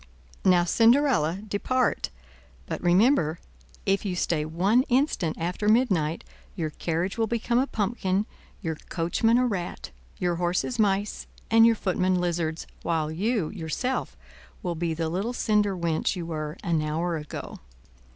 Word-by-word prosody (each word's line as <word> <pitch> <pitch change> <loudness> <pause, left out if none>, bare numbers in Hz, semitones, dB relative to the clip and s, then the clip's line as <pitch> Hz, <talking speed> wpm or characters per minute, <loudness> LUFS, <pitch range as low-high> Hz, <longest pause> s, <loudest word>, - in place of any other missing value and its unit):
"Now, 180 -2 +5
Cinderella, 225 - +3
depart; 255 +5 0 0.6
but - - -4
remember, 175 - +3 0.5
if 195 0 +1
you 190 -3 -2
stay 160 -3 0
one 190 +10 +3
instant 245 - +1
after 180 +5 -1
midnight, 190 -10 +2 0.3
your 160 -5 -2
carriage 170 +7 -2
will 225 - +2
become 235 +1 +1
a 265 - +1
pumpkin, 205 -3 0 0.4
your 160 -3 -2
coachman 185 +7 +2
a 250 - +3
rat, 185 - -4 0.3
your 175 -1 0
horses 180 +7 -1
mice, 200 -1 0 0.2
and 225 0 +7
your 230 - +4
footmen 185 -2 +1
lizards; 170 -2 -1 0.2
while 160 -2 -1
you, 200 +1 0
yourself, 205 +8 -3 0.5
will 175 - -1
be 165 0 -2
the 165 0 -1
little 195 +9 -2
cinder 210 -5 +1
wench 170 +2 0
you 175 -2 -4
were 155 -1 -4
an 170 -5 +1
hour 165 +3 -1
ago." 150 -2 -7
180 Hz, 140 wpm, -26 LUFS, 165-220 Hz, 0.6 s, and